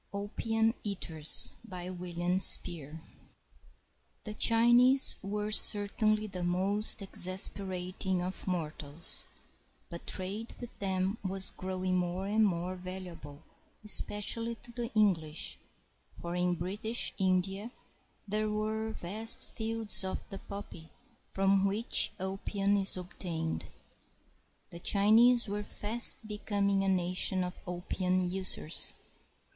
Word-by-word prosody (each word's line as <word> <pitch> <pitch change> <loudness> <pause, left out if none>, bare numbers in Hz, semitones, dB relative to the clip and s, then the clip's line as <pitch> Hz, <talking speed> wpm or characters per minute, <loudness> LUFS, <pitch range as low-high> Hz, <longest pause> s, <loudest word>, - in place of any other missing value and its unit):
] - - -39
OPIUM 225 +2 -2
EATERS 165 -6 +4
BY 185 -4 -9
WILLIAM 175 0 -4
SPEER 160 -4 +5 1.2
[The 210 - -8
Chinese 240 +4 +5
were 210 +1 -5
certainly 215 +1 +6
the 185 -4 -7
most 195 +4 -1
exasperating 185 0 0
of 185 +2 -6
mor 170 -5 -3
tals, 145 +4 -3 0.6
but 170 - -10
trade 200 +5 -4
with 245 - -11
them 190 +1 -3
was 190 0 +1
growing 185 0 -4
more 180 +1 -3
and 215 +2 +1
more 180 0 -4
valu 185 0 -9
able, 145 -2 -14 0.4
especially 230 +2 +3
to 235 - -14
the 235 0 -6
English, 160 - -1 0.5
for 170 0 -8
in 180 0 -1
British 205 +7 -4
India 190 +3 -1 0.6
there 215 +1 -2
were 215 +1 -4
vast 215 +6 +1
fields 225 -2 -3
of 190 - -6
the 195 - -8
poppy 195 -6 -11 0.4
from 195 0 0
which 205 +5 +3
opium 195 +1 -3
is 195 -1 +2
obtained. 175 -3 -6 1.1
The 170 - -10
Chinese 225 +6 +3
were 205 +1 -4
fast 215 +2 0
becoming 200 -2 -2
a - - -2
nation 185 0 0
of 180 0 -8
opium 180 +1 -3
users. 185 -3 +2
195 Hz, 115 wpm, -29 LUFS, 180-210 Hz, 1.2 s, certainly